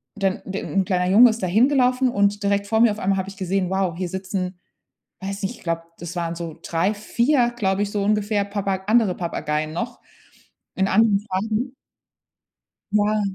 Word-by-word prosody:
dann 195 -1 -1
de 195 +1 -4
'n 195 - 0
kleiner 180 -2 0
Junge 235 +6 +8
ist 225 +1 -3
da 185 - 0
hingelaufen 255 +5 +3
und 200 -1 +1
direkt 200 0 +1
vor 220 +1 +1
mir 235 - +6
auf 210 - -5
einmal 195 0 +1
habe 190 +1 -3
ich 195 - -12
gesehen, 185 0 -1
wow, 190 -3 0
hier 180 -1 -3
sitzen, 185 -1 -4 0.6
weiß 195 +1 -5
nicht, 200 +5 -3
ich - - -19
glaub, 165 -1 -1 0.2
das 170 +1 -7
waren 170 -1 -2
so 165 -2 -7
3, 170 +5 0
4, 240 +4 +1
glaub 195 -4 0
ich, 205 0 0
so 205 -1 -1
ungefähr 210 0 +1
Papa 200 -2 -3
andere 215 -3 +3
Papageien 155 -3 -2
noch 235 +8 -4 0.8
in 190 0 +1
anderen 205 0 +4
Farben. 215 +6 -2 1.2
Ja. 210 +1 +2
200 Hz, 185 wpm, -22 LUFS, 185-215 Hz, 1.2 s, Junge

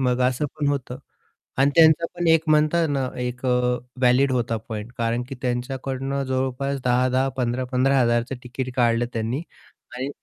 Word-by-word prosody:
मग 125 -1 +1
असं 130 +4 -1
पण 145 -2 -1
होतं, 130 -3 -3 0.6
आणि 140 +1 +4
त्यांचा 165 0 +6
पण 175 -1 -1
एक 160 0 +5
म्हणतात 155 +2 +3
ना, 135 -2 0
एक 125 +1 -4
व्हॅलिड 125 +1 +1
होता 115 -2 0
पॉइंट. 110 +1 -6
कारण 115 +1 0
की 135 - -6
त्यांच्याकडून 135 +2 -2
जवळपास 130 +1 -2
10-10, 130 +2 +2
15-15 130 +2 +1
हजारचं 120 +2 +1
तिकीट 130 +1 -5
काढलं 120 -1 +2
त्यांनी 115 +7 -2 0.5
आणि 130 +2 -3
130 Hz, 145 wpm, -23 LUFS, 125-140 Hz, 0.6 s, त्यांचा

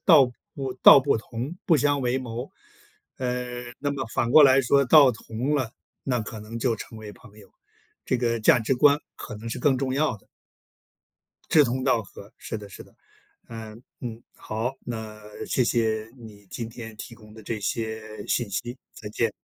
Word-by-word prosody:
“道 155 -7 +7 0.3
不” 135 -2 -4
“道 - - +10
不 140 -1 +2
同， 120 +8 -6
不 165 - +5
相 145 0 +2
为 125 0 0
谋”。 120 0 -6 0.7
呃， 125 -1 -3
那 145 - -1
么 135 -4 -3
反 115 +1 -1
过 155 +4 +8
来 135 -1 +7
说 140 +2 +3
道 140 -1 +7
同 115 +5 -3
了， 130 -6 -1 0.3
那 125 -3 0
可 110 0 -7
能 110 +2 -7
就 115 -1 0
成 110 +1 -9
为 105 -1 -9
朋 105 +1 -17
友， 100 - -16 0.5
这 130 - +1
个 115 -1 0
价 110 - +5
值 115 +4 0
观 145 +3 +5 0.2
可 - - -8
能 110 +2 -7
是 125 - -4
更 135 +1 +3
重 130 -1 -1
要 145 -5 +1
的。 100 - -24 1.2
志 150 -2 +6
同 130 +1 -2
道 115 - +2
合， 100 -1 -13
是 110 - -5
的 105 -1 -9
是 - - -10
的。 - - -23 0.5
嗯， 110 0 -9 0.2
嗯， 115 -1 -6
好， 115 +5 -4
那 110 -2 -6 0.3
谢 125 - +1
谢 110 -2 0
你 105 -4 -13
天 115 +2 -7
提 115 - -9
供 110 -2 -15
的 110 - -12
这 110 +1 -4
些 110 0 -4
信 120 -4 0
息， 120 +6 -4 0.2
再 105 - -8
见， 115 +1 0
120 Hz, 200 characters per minute, -25 LUFS, 110-130 Hz, 1.2 s, 道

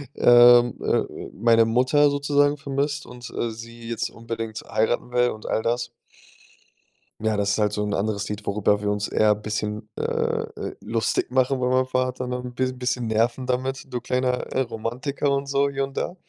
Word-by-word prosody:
ähm, 120 -1 +7
äh, - - -1
meine 115 -1 +4
Mutter 130 +5 +3
sozusagen 145 +1 +2
vermisst 140 +1 -2
und, 125 -1 -10
äh, 115 - -2
sie 115 +1 -10
jetzt 115 -1 -2
unbedingt 115 -1 -6
heiraten 110 +3 0
will 125 0 +3
und 110 - -8
all 110 - 0
das. 120 0 -1 1.3
Ja, 110 -1 0
das 100 0 0
ist 100 - +1
halt 105 -1 +2
so 105 - -1
'n 105 - -2
anderes 100 0 -1
Lied, 105 0 -6
worüber 105 0 +1
wir 105 0 -1
uns 105 0 -2
eher 105 -1 +3
'n 105 +1 -4
bisschen, 105 0 -3
äh, - - -4
äh, - - -2
lustig 115 +2 -1
machen, 130 +1 +2
über 125 0 0
meinen 130 0 +3
Vater 130 0 -1
noch 125 0 -4
'n 125 -1 -7
bis 130 0 -2
bisschen 125 -2 -1
nerven 115 +4 +1
damit, 130 +1 -3
„du 125 - -2
kleiner, 125 0 0 0.2
äh, 130 - +1
Romantiker“ 130 +5 -2
und 140 0 0
so, 140 0 +2
hier 140 0 -2
und 135 0 -5
da 175 - -2
120 Hz, 190 wpm, -24 LUFS, 110-130 Hz, 1.3 s, ähm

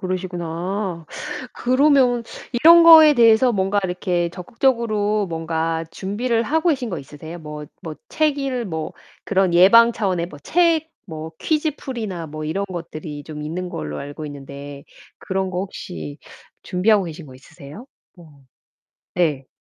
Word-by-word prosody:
그러시구나. 180 -1 -4 0.5
그러면 255 -2 +3 0.3
이런 330 +7 +7
거에 315 -3 +9
대해서 235 +1 +5
뭔가 195 0 0
이렇게 180 -1 -1
적극적으로 215 +1 0
뭔가 165 0 -2
준비를 225 +4 -1
하고 320 +8 +1
계신 260 -6 -2
거 175 - -3
있으세요? 150 +4 -10
뭐 150 -2 -8 0.2
뭐 160 -2 -6
책 305 -2 +1
읽 260 -3 -2
뭐 160 -4 -4 0.3
그런 190 -3 +1
예방 230 +7 +7
차원의 185 -6 -1
뭐 150 -4 -12
책 325 - +2 0.2
뭐 160 -1 -7
퀴즈 310 0 0
풀이나 215 - -5
뭐 155 0 -7
이런 190 +6 -2
것들이 160 -4 -7
좀 150 +1 -8
있는 180 +4 -4
걸로 75 - -5
알고 145 +2 -7
있는데 140 0 -9 0.4
그런 190 -1 -2
거 180 - -3
혹시 80 - -7 0.4
준비하고 200 +2 +2
계신 165 -1 -8
거 130 - -13
있으세요? 155 - -13 0.3
뭐 155 -5 -17 0.7
네. 150 -7 0
185 Hz, 285 characters per minute, -21 LUFS, 160-235 Hz, 0.7 s, 거에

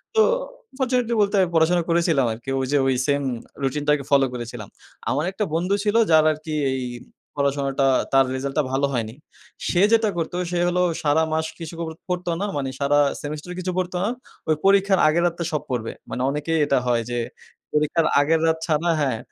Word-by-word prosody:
তো 440 - +6 0.6
ফরচুনেটলি 250 -3 0
বলতে, 200 0 +2 0.2
পড়াশোনা 170 +2 +3
করেছিলাম 165 -5 +2
আরকি। 120 +4 -9
ওই 130 - 0
যে, 145 - +3
ওই 130 - +2
সেম 145 0 +2 0.4
রুটিনটাকে 145 +1 +1
ফলো 140 -1 +5
করেছিলাম। 120 -3 -7 0.4
আমার 145 +5 0
একটা 210 - -2
বন্ধু 180 +4 +1
ছিল 210 +1 0 0.2
যার 155 -1 +6
আরকি 155 0 -6 0.2
এই 130 -1 -2 0.5
পড়াশোনাটা, 140 -1 0 0.3
তার 135 0 +6
রেজাল্ট 135 +1 -4
টা - - +3
ভালো 135 +1 +1
হয়নি। 115 -1 -3 0.5
সে 180 - +2
যেটা 225 -2 +4
করত 165 0 -2 0.2
সে 175 - 0
হলো 180 +1 +1 0.2
সারা 155 +2 +3
মাস 160 0 0
কিছু 165 0 -7
ক - - -3 0.3
পড়তো 180 -1 -1
না, - - 0
মানে 135 -1 -2
সারা 145 +1 +3 0.2
সেমেস্টার 150 +4 -6
কিছু 185 0 -2
পড়তো 185 0 -1
না। 210 - +1 0.4
ওই 155 - +4
পরীক্ষার 195 -1 +4
আগের 170 +3 +2
রাত্রে 170 0 -3
সব 150 - 0
পড়বে। 120 -3 -2 0.2
মানে 125 - -4
অনেকেই 155 +3 -1
এটা 140 - +2
হয় 120 -1 +2
যে, 120 - -1 0.5
পরীক্ষার 150 +2 +2
আগের 160 +3 +2
রাত 160 0 +2
ছাড়া 165 +2 +1
হ্যাঁ, 135 -6 0
155 Hz, 185 wpm, -23 LUFS, 140-175 Hz, 0.6 s, তো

